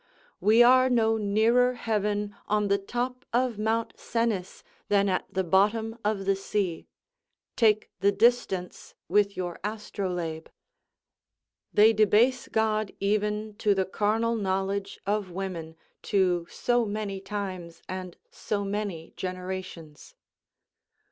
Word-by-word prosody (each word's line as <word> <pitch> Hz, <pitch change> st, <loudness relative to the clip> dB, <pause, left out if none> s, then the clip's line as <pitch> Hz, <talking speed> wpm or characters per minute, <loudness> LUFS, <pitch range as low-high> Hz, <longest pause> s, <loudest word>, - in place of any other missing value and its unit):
We 225 Hz, +3 st, +6 dB
are 255 Hz, +1 st, +6 dB
no 225 Hz, -2 st, +3 dB
nearer 225 Hz, +4 st, +3 dB
heaven 210 Hz, -3 st, -1 dB
on 210 Hz, -1 st, +1 dB
the 200 Hz, 0 st, +3 dB
top 250 Hz, +5 st, -3 dB
of 240 Hz, -3 st, +1 dB
Mount 225 Hz, +1 st, 0 dB
Cenis 225 Hz, -6 st, -2 dB, 0.2 s
than 200 Hz, -1 st, +3 dB
at 185 Hz, -1 st, -1 dB
the 190 Hz, -, 0 dB
bottom 215 Hz, +6 st, +1 dB
of 205 Hz, -2 st, -1 dB
the 195 Hz, 0 st, +2 dB
sea; 195 Hz, -3 st, -2 dB, 0.7 s
take 215 Hz, -2 st, +2 dB
the 200 Hz, -, +3 dB
distance 200 Hz, -4 st, 0 dB
with 200 Hz, +2 st, +2 dB
your 175 Hz, -2 st, -4 dB
astrolabe. 180 Hz, -6 st, -4 dB, 1.2 s
They 215 Hz, +2 st, +6 dB
debase 220 Hz, +4 st, +3 dB
God 215 Hz, -2 st, 0 dB
even 210 Hz, +1 st, 0 dB
to 210 Hz, -2 st, +2 dB
the 190 Hz, -1 st, +1 dB
carnal 220 Hz, +4 st, 0 dB
knowledge 195 Hz, -1 st, -2 dB
of 205 Hz, -1 st, -1 dB
women, 175 Hz, -3 st, -5 dB, 0.3 s
to 180 Hz, -4 st, +2 dB
so 240 Hz, -1 st, +1 dB
many 205 Hz, -2 st, -3 dB
times, 190 Hz, -4 st, -6 dB
and 185 Hz, -1 st, -6 dB
so 200 Hz, -1 st, -3 dB
many 200 Hz, -5 st, -4 dB
generations. 185 Hz, -, -7 dB
205 Hz, 120 wpm, -27 LUFS, 190-220 Hz, 1.2 s, We